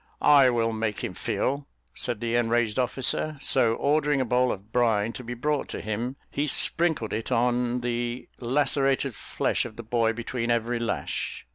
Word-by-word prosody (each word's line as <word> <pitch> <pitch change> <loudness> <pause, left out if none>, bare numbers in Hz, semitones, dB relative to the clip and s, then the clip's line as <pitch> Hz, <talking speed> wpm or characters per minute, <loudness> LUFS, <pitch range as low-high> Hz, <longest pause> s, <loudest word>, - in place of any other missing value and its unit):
"I 140 -3 +7
will 115 -2 +1
make 110 -2 -2
him - - -3
feel," 140 +1 -2 0.3
said 120 -4 -3
the 115 0 -1
enraged 120 -1 +1
officer; 130 +4 0
so 120 -4 +2
ordering 145 +1 +2
a 130 - +1
bowl 125 +1 +2
of 100 +3 -7
brine 115 -2 +2
to 130 - -7
be 120 +1 -5
brought 145 +4 -1
to - - -4
him, 115 +5 -3 0.2
he 145 +2 -1
sprinkled 160 -6 +1
it 110 +4 -3
on 125 0 +1
the 120 0 -3
lacerated 135 +1 +1
flesh - - -1
of 115 -3 -8
the 115 - -8
boy 115 0 +1
between 120 +1 -3
every 120 0 +1
lash. 115 0 -3
120 Hz, 170 wpm, -26 LUFS, 115-130 Hz, 0.3 s, I